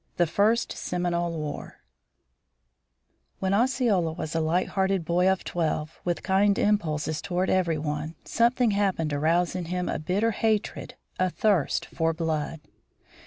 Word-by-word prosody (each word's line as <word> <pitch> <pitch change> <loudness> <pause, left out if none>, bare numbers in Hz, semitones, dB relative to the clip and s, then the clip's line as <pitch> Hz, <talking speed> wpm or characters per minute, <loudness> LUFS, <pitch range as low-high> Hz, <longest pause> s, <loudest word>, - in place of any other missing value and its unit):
THE 175 - +4
FIRST 210 +8 +2
SEMINOLE 175 -1 -2
WAR 150 -1 -6 1.6
When 190 0 -1
Osceola 225 -8 +2
was 160 -1 -5
a 165 - +1
light 160 +3 +1
hearted 190 -3 0
boy 180 +3 +3
of 190 -1 0
twelve, 155 -3 -2
with 175 -1 -2
kind 200 +1 +3
impulses 155 -7 0
toward 185 0 -1
every 175 -4 +2
one, 150 +1 -3
something 240 0 +2
happened 195 -6 0
to 145 - -1
rouse 170 +3 +2
in 180 -2 -3
him 180 +1 -2
a - - -2
bitter 200 +8 +1
hatred, 220 0 -1 0.2
a 185 0 +2
thirst 195 -4 +1
for 165 0 -1
blood. 160 -1 -2
180 Hz, 145 wpm, -26 LUFS, 160-200 Hz, 1.6 s, THE